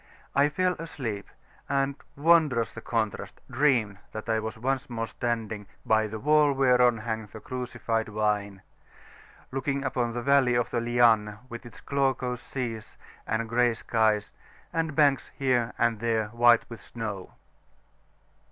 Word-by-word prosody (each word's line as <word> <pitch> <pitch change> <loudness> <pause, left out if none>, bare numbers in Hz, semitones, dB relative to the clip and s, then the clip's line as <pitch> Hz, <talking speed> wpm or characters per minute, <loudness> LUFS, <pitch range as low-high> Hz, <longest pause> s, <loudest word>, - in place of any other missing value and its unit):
I 140 +1 +4
fell 180 +5 +1
asleep, 120 -11 -5 0.4
and 140 0 +1 0.2
wondrous 150 -6 +3
the 115 - -8
contrast! 110 -3 -3
dreamed 120 -7 +2
that 110 +1 -6
I 110 -1 +1
was 110 0 -5
once 130 +3 -1
more 115 -1 -2
standing 110 -2 -3 0.2
"By 110 0 +3
the 110 +1 -6
wall 150 +3 +4
whereon 125 -3 +4
hangeth 110 -1 -5
the 110 - -8
crucified 120 -2 -3
vine," 105 -2 -1 0.9
[p.413]looking 135 +1 -2
upon 120 -3 -1
the 120 0 -3
valley 135 -2 +4
of 120 -1 0
the 120 - 0
Lianne, 115 -3 +3
with 120 +1 -8
its 120 - -14
glaucous 130 -3 -1
seas 115 -5 -5 0.3
and 115 +1 -1
grey 120 0 +2
skies, 110 -2 +1 0.4
and 160 -2 -1
banks 145 -3 +3
here 125 -3 +1
and 115 -2 +1
there 110 -2 0
white 120 +1 +4
with 115 - -10
snow. 105 -5 -6
120 Hz, 145 wpm, -27 LUFS, 110-135 Hz, 0.9 s, I